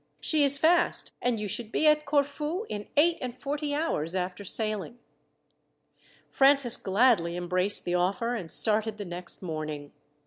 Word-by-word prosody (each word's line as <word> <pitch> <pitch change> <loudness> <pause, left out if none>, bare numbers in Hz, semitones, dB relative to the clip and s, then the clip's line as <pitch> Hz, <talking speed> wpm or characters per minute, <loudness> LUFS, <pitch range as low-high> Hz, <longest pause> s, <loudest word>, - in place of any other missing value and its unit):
She 310 -2 +2
is 280 0 +2
fast, 340 +4 +1
and 245 -2 0
you 210 - -3
should 220 +2 -4
be 315 - 0
at 300 -1 +3
Corfu 295 +6 -1
in 205 0 -6
eight 335 +3 +3
and 250 -1 -5
forty 290 +1 -3
hours 185 - -2
after 185 +2 -3
sailing." 215 +3 -3 1.3
Francis 275 -3 +6
gladly 195 -4 +2
embraced 180 +3 -1
the 175 - -2
offer, 195 +7 0
and 185 -9 -5
started 215 0 +1
the 205 - -6
next 175 +1 -8
morning. 155 -3 -5
220 Hz, 150 wpm, -27 LUFS, 180-285 Hz, 1.3 s, Francis